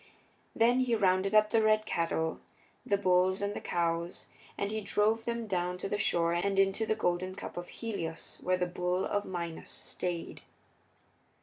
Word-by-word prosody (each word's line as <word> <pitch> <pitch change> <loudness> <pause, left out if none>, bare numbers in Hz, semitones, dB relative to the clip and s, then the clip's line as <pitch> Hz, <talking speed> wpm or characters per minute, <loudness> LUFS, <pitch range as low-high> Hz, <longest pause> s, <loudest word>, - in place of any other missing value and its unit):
Then 240 +3 +4
he 250 -2 +2
rounded 195 0 +2
up 215 0 +5
the 225 - +4
red 215 0 +3
cattle, 165 -3 -1 0.4
the 200 - +1
bulls 185 -1 +3
and 200 0 -1
the - - -5
cows, 170 0 -2 0.3
and 200 +1 -1
he 220 0 -2
drove 215 +3 +1
them 235 -1 -2
down 180 -3 -1
to 180 - -4
the 205 +1 -2
shore 170 -4 +2
and 195 +3 0
into 195 +3 +2
the 220 - +2
golden 185 -2 -1
cup - - -7
of 175 0 -6
Helios 170 -8 -5
where 185 0 +1
the 180 - +1
bull 180 +1 -1
of 205 0 -1
Minos 170 -3 -5
stayed. 175 -2 -4
190 Hz, 175 wpm, -31 LUFS, 175-215 Hz, 0.4 s, up